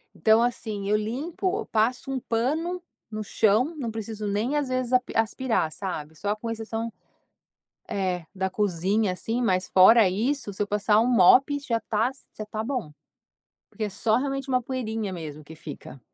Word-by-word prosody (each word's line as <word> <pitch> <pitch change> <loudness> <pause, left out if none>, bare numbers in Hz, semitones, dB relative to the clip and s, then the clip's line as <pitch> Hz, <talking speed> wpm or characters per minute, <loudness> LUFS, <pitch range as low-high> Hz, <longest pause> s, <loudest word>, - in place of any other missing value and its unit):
Então 220 +1 +4
assim, 215 -4 -2
eu 210 - +4
limpo, 315 - -2
eu 445 - -4
passo 240 +5 0
um 265 - -1
pano 305 +11 -1 0.3
no 215 0 -4
chão, 225 +9 +2
não 240 -6 -3
preciso 220 -1 -5
nem 215 +8 0
às 290 -2 0
vezes 255 -1 -1
api 250 0 +2
aspirar, 225 -5 +1
sabe. 160 -4 -5
Só 200 +6 -1
com 230 +2 -6
exceção, 225 0 -4 1.0
eh, 185 -3 -1
da 190 0 -1
cozinha, 195 +1 +1
assim. 225 +6 -2
Mas, 185 -5 +1
fora 195 +3 +7
isso, 225 +4 -1
se 190 - -11
eu 205 - +2
passar 210 +1 +2
um 230 - +2
mop, 250 +5 +6
já 250 -5 -1
está 220 +2 0 0.3
já - - -5
está 215 +1 -4
bom. 240 - -3 0.8
Porque 220 - -5
é - - -1
só 215 +2 +1
realmente 275 +1 -2
uma 255 -1 +2
poeirinha 225 -5 -3
mesmo 155 -4 -7
que 160 - -11
fica. 145 -3 -10
220 Hz, 175 wpm, -26 LUFS, 200-250 Hz, 1.0 s, fora